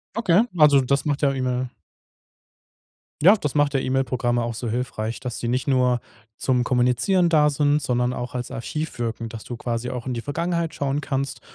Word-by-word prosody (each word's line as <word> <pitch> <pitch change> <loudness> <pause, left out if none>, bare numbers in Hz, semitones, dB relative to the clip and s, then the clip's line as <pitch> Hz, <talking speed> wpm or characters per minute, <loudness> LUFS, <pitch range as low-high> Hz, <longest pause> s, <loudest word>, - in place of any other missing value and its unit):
Okay, 210 -4 +4 0.2
also, 145 -3 +6
das 140 +2 0
macht 145 -1 -1
ja 140 -2 +3
E-Mail 130 -1 -1 1.5
Ja, 195 +5 +8
das 150 -9 -3
macht 145 -1 +2
ja - - +3
E-Mail-Programme 130 -2 0
auch 115 -1 -3
so 120 - -4
hilfreich, 115 -1 -3
dass 125 -2 -5
die 120 - -3
nicht 125 +1 -1
nur 125 -3 +2 0.4
zum 125 -2 +1
Kommunizieren 125 +10 +2
da 150 -2 +4
sind, 145 +1 +2
sondern 125 -3 0
auch 125 0 -5
als 125 -1 -4
Archiv 150 +6 -5
wirken, 115 -1 -3
dass 110 -1 -8
du 120 - -7
quasi 120 +1 -3
auch 125 -1 -6
in 125 - -2
die 115 - -3
Vergangenheit 170 +4 -2
schauen 140 +1 -1
kannst, 140 -2 -3
130 Hz, 185 wpm, -23 LUFS, 120-145 Hz, 1.5 s, Ja